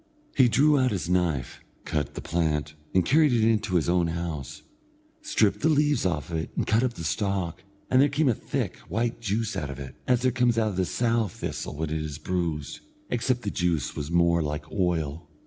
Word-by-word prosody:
He 130 -3 +5
drew 145 +4 +4
out 130 -1 +3
his 95 -7 -2
knife, 85 -7 0 0.3
cut 75 -3 -2
the - - -5
plant, 75 -3 -1 0.2
and 95 -2 +3
carried 150 - +4
it 115 -2 +3
into 110 -4 +1
his 85 - +2
own 85 -1 +2
house; 80 -4 -5 0.6
stripped 105 - +2
the 160 - +2
leaves 145 -8 +3
off 85 -2 -3
it 80 -1 -2
and - - 0
cut 110 +2 +3
up 125 -2 0
the 85 - -7
stalk; 95 0 -2 0.2
and 130 +1 +4
there 145 - +4
came 145 +2 +1
a 125 - +4
thick, - - -3
white 115 +1 -1
juice 110 +1 -1
out 70 - -3
of 70 - -6
it, 70 -2 -8
as 125 -1 +2
there 130 - +3
comes 125 -2 +2
out 110 -1 +2
of 95 - -5
the 95 - +2
sow 115 +2 +1
thistle 85 - -5
when 80 +1 -3
it 80 0 -1
is 75 -1 -5
bruised, 80 -3 -3 0.3
except 120 +1 0
that 100 - -2
the - - -15
juice 85 -3 0
was 75 +1 -4
more 85 0 +3
like 75 0 -4
oil. 85 -4 -1
90 Hz, 215 wpm, -26 LUFS, 80-120 Hz, 0.6 s, He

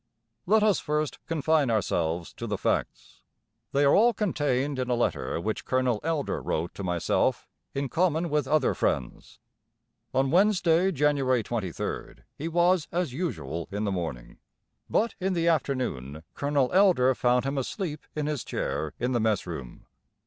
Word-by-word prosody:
Let 215 +2 +4
us 210 -4 +3
first 150 0 -2
confine 155 -3 +2
ourselves 85 -6 -1
to - - -6
the - - -2
facts. - - -2 0.5
They 140 +1 +3
are 140 - +5
all 235 +2 +5
contained 145 - 0
in 130 0 -2
a 125 - +2
letter 120 -7 -1
which 110 +5 -3
Colonel 130 -4 +1
Elder 160 -3 -1
wrote 80 +2 -2
to 100 - -7
myself 90 -2 0 0.3
in 140 0 -1
common 165 +1 +1
with 150 -3 +1
other 150 -1 +2
friends. - - -2 0.7
On 135 0 +1
Wednesday, 185 -2 +4
January 140 -5 +2
23rd, 105 -7 -4
he 155 - -4
was 175 0 +2
as 170 -6 -1
usual 85 - -3
in 100 +2 -2
the 100 - 0
morning; 80 -10 -5 0.5
but 230 +2 +1
in 190 0 0
the 170 -1 0
afternoon 125 - -1
Colonel 140 -3 0
Elder 180 -10 +5
found 125 0 +2
him 135 0 -1
asleep 150 - -4
in 150 -1 -1
his 150 -4 -2
chair 70 +3 -3
in 125 +2 0
the 120 - +1
mess 110 -3 +1
room. 75 -8 -8
135 Hz, 155 wpm, -27 LUFS, 110-165 Hz, 0.7 s, are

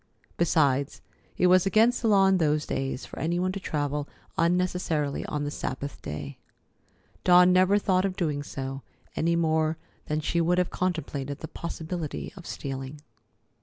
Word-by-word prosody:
Besides, 140 -5 +2 0.4
it - - +3
was 185 +1 +5
against 225 +5 +4
the 230 - +1
law 200 -3 +5
in 190 0 +4
those 150 -2 +1
days 135 0 -3
for - - -9
any 170 +2 0
one 185 +1 0
to 195 - -4
travel 145 -4 -2 0.3
unnecessarily 170 -4 0
on 150 -1 -2
the 145 - -3
Sabbath 140 0 -5
day. 75 -2 -6 0.8
Dawn 180 0 +7
never 185 +2 +5
thought 185 -3 +2
of 195 -1 -1
doing 150 -6 -1
so, 135 -1 -5 0.3
any 170 +1 +1
more 160 -1 +1 0.3
than 150 0 0
she 170 +2 0
would 175 +2 +2
have 180 -1 +1
contemplated 145 -6 -2
the 160 - -5
possibility 165 -1 -5
of 180 -3 -11
stealing. 135 +1 -6
160 Hz, 160 wpm, -27 LUFS, 145-180 Hz, 0.8 s, Dawn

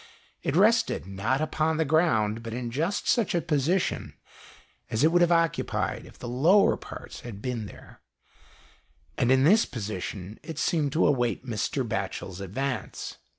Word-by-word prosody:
It 140 - -1
rested, 225 +5 +3
not 100 +9 -1
upon'the 155 +1 0
ground, 115 -9 +2
but 115 0 -6
in 120 -1 -4
just 165 - -1
such 230 -7 +2
a - - +3
position 160 +4 0 0.7
as 110 +5 0
it 160 - +5
would 175 +1 +4
have 175 0 +4
occupied 165 -1 0
if - - -16
the 120 - -7
lower 160 +12 +4
parts - - -9
had 115 -5 -8
been 115 -2 -3
there, - - -14 1.1
and 120 - +2
in 130 0 +5
this 210 +9 +5
position 105 -2 -5
it 160 0 -8
seemed 155 -5 +1
to 165 - +3
await 120 - +1
Mr. - - -2
Batchel's 95 0 -4
advance. 125 +8 -4
135 Hz, 150 wpm, -27 LUFS, 115-165 Hz, 1.1 s, it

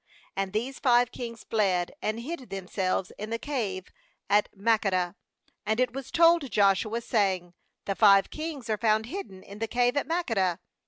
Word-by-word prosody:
16And 195 -1 -2
these 245 +5 -2
five 245 -2 +4
kings 230 -2 -7
fled, 190 -5 +1
and 215 +2 -2
hid 270 -1 -6
themselves 190 -1 -2
in 210 +1 -5
the 230 - -1
cave 215 -9 -3 0.4
at 205 +1 +4
Makkedah. 195 -4 +1 0.5
17And 220 +2 +1
it 250 -1 +1
was 270 -1 -6
told 335 -4 +4
Joshua, 210 +3 +2
saying: 190 -6 0 0.3
'The 200 - 0
five 195 -2 +5
kings 310 -5 -5
are 215 -2 -1
found, 220 -1 +2
hidden 240 - -7
in 200 +1 -11
the 225 - -1
cave 245 +2 +1
at 285 - 0
Makkedah.' 225 - 0
220 Hz, 165 wpm, -28 LUFS, 195-250 Hz, 0.5 s, five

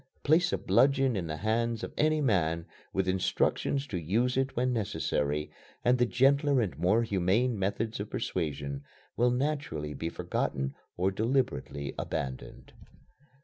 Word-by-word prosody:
Place 175 +4 +4
a - - +1
bludgeon 135 -2 +3
in 90 -4 -2
the 75 -1 -4
hand 115 +2 0
of - - -5
any 155 0 +2
man, 85 - +1 0.3
with 95 -1 0
instructions 95 +8 +1
to 100 -11 -4
use 115 +10 +1
it 135 +1 0
when 125 +1 +1
necessary, 75 -9 -1 0.3
and 125 +1 +4
the 120 - +4
gentler 140 +3 +3
and 105 -7 -1
more 110 +6 +2
humane 105 +3 +1
methods 100 +3 -1
of 105 +1 -4
persuasion 70 -5 -3 0.3
will 120 +1 +3
naturally 125 - -2
be 80 - -3
forgotten 65 -4 -2 0.2
or 95 +2 +2
deliberately 110 - -1
abandoned. 65 -5 -5
110 Hz, 145 wpm, -30 LUFS, 85-130 Hz, 0.3 s, Place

